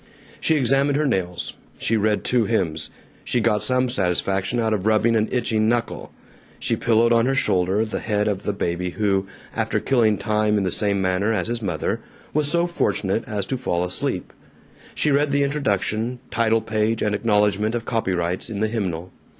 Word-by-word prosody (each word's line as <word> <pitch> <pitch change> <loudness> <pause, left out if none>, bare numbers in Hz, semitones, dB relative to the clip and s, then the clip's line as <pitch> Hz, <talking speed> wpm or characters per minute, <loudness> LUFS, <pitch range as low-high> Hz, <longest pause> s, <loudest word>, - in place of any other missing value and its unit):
She 160 - +2
examined 135 +1 +2
her 150 - +1
nails. 90 -9 -2 0.2
She 115 - 0
read 105 -1 +1
two 120 -3 +2
hymns. 85 -8 -1 0.3
She 125 - +1
got 110 -2 +2
some 125 0 +1
satisfaction 95 0 0
out 110 -1 +1
of 105 -1 -1
rubbing 110 +1 +3
an 110 0 +1
itching 110 -3 +1
knuckle. 120 0 -2 0.5
She - - +1
pillowed 115 +1 +3
on 115 +1 +3
her 135 - +1
shoulder 95 -3 +1
the 110 - -4
head 105 -2 0
of 100 -2 -1
the - - -1
baby 90 -2 -2
who, 95 0 0 0.3
after - - 0
killing 115 -6 +2
time 105 0 +1
in 100 - +1
the 95 - 0
same 100 -2 0
manner 95 +4 +1
as 110 - -1
his 120 0 -2
mother, 90 -7 -2 0.3
was 150 -1 +2
so 170 +2 +2
fortunate 110 - 0
as 105 -3 -2
to 130 - -2
fall 90 -9 -1
asleep. 90 - -3 0.6
She 150 - +2
read 145 +1 +3
the 140 0 +2
introduction, 125 -4 -1
title 115 -1 +2
page, 110 +1 0
and 105 - +1
acknowledgment 105 0 +1
of 115 -1 -3
copyrights, 90 -4 -1
in 105 -3 -4
the 110 +1 +1
hymnal. 90 -6 -3
110 Hz, 185 wpm, -22 LUFS, 100-120 Hz, 0.6 s, rubbing